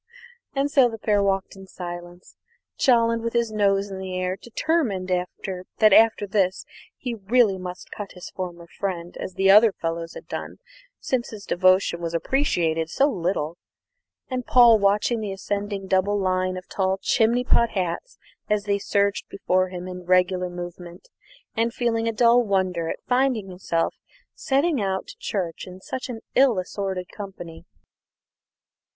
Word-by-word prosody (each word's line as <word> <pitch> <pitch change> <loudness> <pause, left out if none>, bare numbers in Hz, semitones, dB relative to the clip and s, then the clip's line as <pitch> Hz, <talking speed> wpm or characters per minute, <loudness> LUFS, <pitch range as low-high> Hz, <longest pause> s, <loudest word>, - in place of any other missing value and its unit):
And 275 +1 0
so 270 -5 +5
the 225 - -7
pair 210 -1 +1
walked 195 -1 0
on 195 - -12
in 190 - -12
silence; 175 -1 -9 0.4
Jolland 230 -2 +3
with 230 0 -3
his 235 -2 +1
nose 200 -1 +1
in 190 - -5
the 185 -1 -4
air, 185 0 -1
determined 235 - -1 0.7
that 215 -2 +6
after 220 -1 +5
this 190 -2 0 0.3
he 250 -2 -4
really 215 -1 +2
must 180 0 -8
cut 205 -2 -7
his 180 - -10
former 175 -2 -6
friend 175 -1 -5
as 185 - -6
the 195 0 +4
other 215 +2 +7
fellows 165 -1 -4
had - - -10
done, - - -6 0.4
since 250 -2 -1
his 210 -2 -9
devotion 185 -1 +3
was 170 0 -3
appreciated 165 - 0
so 280 - +2
little, 170 - -2 0.7
and 255 -2 -4
Paul 235 -3 +7
watching 205 +4 +2
the 205 -3 -3
ascending 200 0 -3
double 190 +2 +2
line 185 -1 0
of 185 - -9
tall 190 -1 0
chimney 235 +3 +2
pot 235 -2 +3
hats 185 - -3 0.3
as 210 -1 +1
they 200 -1 0
surged 200 0 0
before 185 -1 0
him 180 0 -7
in 180 -1 -8
regular 180 0 +2
movement, 175 0 -9 0.5
and 230 +1 0
feeling 230 -2 0
a - - +2
dull 235 +2 +5
wonder 185 -6 0
at - - -5
finding 250 -5 +1
himself 180 -2 -1 0.4
setting 280 0 +1
out 190 -1 -1
to - - -11
church 180 -5 -3
in 185 0 -10
such 260 +7 -6 0.2
ill 260 -5 +4
assorted 185 0 -3
company. 175 -5 -9
195 Hz, 155 wpm, -24 LUFS, 180-225 Hz, 0.7 s, other